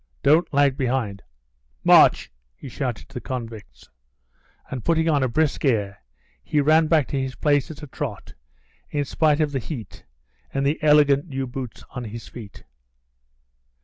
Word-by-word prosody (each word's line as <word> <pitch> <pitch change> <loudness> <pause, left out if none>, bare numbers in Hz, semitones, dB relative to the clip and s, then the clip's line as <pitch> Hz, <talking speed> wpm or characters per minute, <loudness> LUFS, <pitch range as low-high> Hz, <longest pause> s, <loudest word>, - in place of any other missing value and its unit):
Don't 155 +5 +4
lag 140 -1 +3
behind; 120 -7 -1 0.6
march!" - - +5 0.2
he - - -11
shouted 125 -3 -4
to - - -20
the 125 - -5
convicts, 115 -4 -7 0.8
and 125 -4 -5
putting 165 -1 +1
on 150 -3 +2
a 130 - +2
brisk 150 +4 0
air, 105 -7 0 0.4
he 150 - 0
ran 155 +2 +4
back 155 -4 +3
to 140 - -1
his 130 -1 -4
place 145 -2 +1
at 155 -1 -10
a - - -7
trot, 130 -6 -6 0.6
in 145 -1 -1
spite 155 +2 +2
of 150 -2 +1
the 135 - -1
heat 125 -3 -8 0.5
and 135 0 -1
the 150 +3 0
elegant 150 0 +4
new 135 -3 -3
boots 125 -2 -7
on 125 -2 -6
his 115 +1 -8
feet. 105 -6 -11
135 Hz, 160 wpm, -23 LUFS, 125-150 Hz, 0.8 s, march